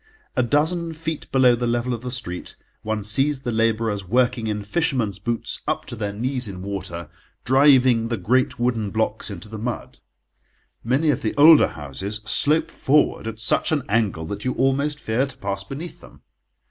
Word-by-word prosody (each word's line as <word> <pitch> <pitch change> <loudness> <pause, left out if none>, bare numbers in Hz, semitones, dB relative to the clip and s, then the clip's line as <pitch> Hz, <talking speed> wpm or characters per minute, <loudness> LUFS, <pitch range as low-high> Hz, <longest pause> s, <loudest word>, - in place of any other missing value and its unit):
A - - +3
dozen 160 +6 0
feet 160 -1 -5
below 130 -2 +5
the 120 0 -1
level 120 +1 0
of 115 - -5
the 125 - -5
street 115 -8 -6 0.3
one 110 -1 -3
sees 135 +7 +2
the 125 - -3
labourers 110 -2 0
working 120 +3 +1
in 105 -1 -2
fishermen's 115 - -1
boots 115 +3 -3
up - - -1
to - - -7
their 105 -1 -3
knees 125 +3 -2
in 95 -2 -7
water, 95 -4 -5 0.4
driving 130 -3 +5
the 115 -1 -2
great 125 +7 +1
wooden 120 -4 0
blocks 110 +1 -1
into 95 -2 -8
the 110 0 -8
mud. 120 +1 -5 0.8
Many 135 +6 +2
of 130 - -2
the 110 - -2
older 155 +2 +8
houses 95 +9 -5
slope 150 +7 +1
forward 145 -5 +1
at 110 -1 -5
such 110 +7 +1
an 150 -3 +1
angle 100 -7 0
that 100 +5 -6
you 130 - -1
almost 140 +3 0
fear 120 +5 0
to 135 -1 -9
pass 100 -3 -3
beneath 145 +11 -8
them. - - -16
120 Hz, 180 wpm, -22 LUFS, 105-135 Hz, 0.8 s, older